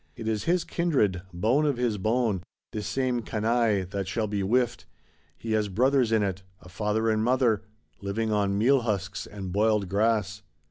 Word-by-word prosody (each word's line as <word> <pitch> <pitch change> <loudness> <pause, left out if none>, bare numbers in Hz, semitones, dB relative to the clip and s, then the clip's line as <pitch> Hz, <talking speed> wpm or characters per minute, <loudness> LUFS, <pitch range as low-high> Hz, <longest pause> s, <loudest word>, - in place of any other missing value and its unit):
It 115 -2 -6
is 110 -2 -1
his 175 +1 +2
kindred, 130 - 0
bone 110 - +1
of 145 -4 +1
his 120 -4 0
bone, 110 -2 +1 0.3
this 105 -1 -4
same 130 -2 0
canaille 110 -2 +1
that 100 -2 -3
shall 110 +3 -1
be 105 -1 -2
whiffed; 120 +4 0 0.5
he 115 - -5
has 110 -1 +1
brothers 125 +4 +2
in 110 -2 +3
it, 95 -1 -2 0.2
a 90 - -15
father 105 +3 -1
and 110 0 +1
mother,—living 110 -3 -1
on 100 -2 +1
meal 130 +6 +4
husks 100 -4 -3
and 95 -3 -7
boiled 105 -1 +2
grass. 105 0 +1
110 Hz, 170 wpm, -27 LUFS, 100-120 Hz, 0.5 s, meal